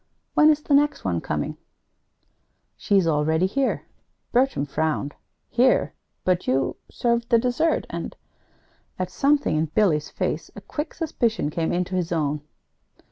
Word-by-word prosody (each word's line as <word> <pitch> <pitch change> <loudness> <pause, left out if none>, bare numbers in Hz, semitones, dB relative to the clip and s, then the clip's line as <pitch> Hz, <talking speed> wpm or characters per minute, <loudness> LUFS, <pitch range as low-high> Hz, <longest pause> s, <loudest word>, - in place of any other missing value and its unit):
When 305 - +6
is 300 -1 +2
the 290 - 0
next 290 +1 +3
one - - 0
coming?" - - -3 1.2
"She's 195 -4 +2
already 160 +2 +2
here." 265 +8 0 0.5
Bertram 250 - +2
frowned. 150 -1 -1 0.3
"Here? 255 +2 +3 0.3
But 185 -1 +1
you 135 +1 +1
served 235 -1 0
the 235 - +6
dessert, 250 +7 +1
and - - -5 0.4
" - - -39
At 185 0 -3
something 285 - +2
in 155 +1 +1
Billy's 155 -3 +1
face, - - -3
a - - -8
quick 300 +1 -5
suspicion 230 - -1
came 165 +1 -1
into 180 +1 -1
his 175 -2 -1
own. 150 -3 0
190 Hz, 140 wpm, -24 LUFS, 160-260 Hz, 1.2 s, When